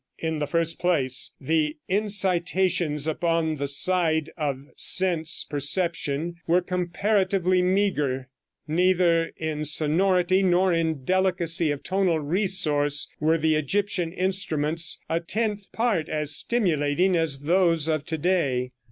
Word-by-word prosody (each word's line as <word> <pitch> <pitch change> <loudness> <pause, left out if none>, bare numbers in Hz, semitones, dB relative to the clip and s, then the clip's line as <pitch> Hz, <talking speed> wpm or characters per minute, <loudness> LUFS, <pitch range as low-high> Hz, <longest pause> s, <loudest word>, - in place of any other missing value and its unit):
In 160 -1 -3
the 150 - -2
first 165 0 0
place, 145 -8 +1
the 155 +2 -1
incitations 185 -6 +1
upon 160 0 -1
the 140 0 -3
side 160 +1 +2
of 140 -4 -3
sense 175 -3 +2
perception 165 +1 -1
were 175 +2 +3
comparatively 185 +1 0
meager. 180 -9 0 0.4
Neither 170 0 +2
in 155 -1 -4
sonority 180 +5 +2
nor 185 0 +2
in 160 -4 -1
delicacy 180 -1 +1
of 145 -1 -4
tonal 190 -4 0
resource 150 -4 0
were 160 +2 +2
the 160 0 +1
Egyptian 180 +2 -1
instruments 165 -4 0
a 165 - -1
tenth 210 +3 -3
part 220 -9 -1
as 150 -1 0
stimulating 180 -5 +1
as 160 -5 -1
those 165 -1 +2
of 155 -2 -1
to 160 - -3
day. 145 -7 0
165 Hz, 120 wpm, -24 LUFS, 150-185 Hz, 0.4 s, were